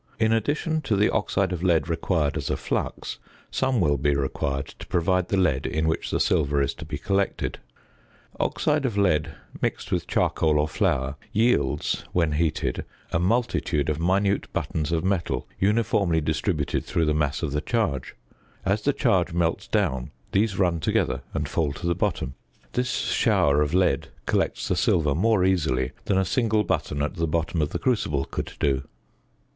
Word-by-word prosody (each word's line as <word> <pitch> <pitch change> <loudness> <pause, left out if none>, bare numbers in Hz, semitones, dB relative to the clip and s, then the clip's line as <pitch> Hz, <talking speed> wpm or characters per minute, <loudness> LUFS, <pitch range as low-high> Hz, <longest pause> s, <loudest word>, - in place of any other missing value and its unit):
In 110 0 +3
addition 150 - 0
to 110 - 0
the 105 +2 +3
oxide 100 -2 0
of 85 - -3
lead 85 -4 +2
required 80 -3 0
as - - -3
a - - 0
flux, - - -3 0.3
some 130 -2 +1
will 75 -6 +2
be 70 +1 +2
required 70 0 -1
to - - -9
provide 90 +1 +1
the 100 - 0
lead 80 -9 +2
in 80 +1 0
which 80 - -1
the - - 0
silver 70 0 +2
is 70 - +1
to - - -9
be 80 - -4
collected. 100 -2 -1 0.8
Oxide 150 -1 +1
of 110 -5 -3
lead, 80 -6 +2 0.3
mixed - - -2
with - - 0
charcoal 80 -2 +2
or 75 +1 +2
flour, 65 -2 0
yields, 110 -9 +1
when 85 -3 +2
heated, 80 +1 0 0.3
a 80 - +1
multitude 90 -6 +1
of 75 - -3
minute 95 +3 +1
buttons 80 0 -2
of 80 -1 0
metal 95 -2 -1
uniformly 100 -4 +2
distributed 80 -1 -1
through 85 - 0
the 75 - +2
mass 75 -1 0
of 75 - -1
the 75 +1 -1
charge; 105 - -1 0.5
as 100 +2 +1
the 145 +6 +2
charge 95 - +2
melts 85 +3 0
down 75 - 0 0.2
these 100 -1 +1
run 90 -4 +2
together - - 0
and 75 -2 -1
fall 75 -1 0
to 75 - -8
the 85 - +2
bottom; 90 -8 -1 0.4
this 125 0 0
shower 75 -9 +2
of 75 +3 0
lead 90 -1 +2 0.2
collects - - 0
the - - +1
silver 75 -4 +2
more 95 +3 +3
easily 75 -9 +1
than 95 - +1
a 95 - +2
single 110 +1 +2
button 75 -6 -1
at 75 - -2
the 85 0 0
bottom 80 +1 0
of 75 - 0
the - - -3
crucible 80 - 0
could - - -5
do. 70 -1 +1
85 Hz, 175 wpm, -25 LUFS, 75-100 Hz, 0.8 s, In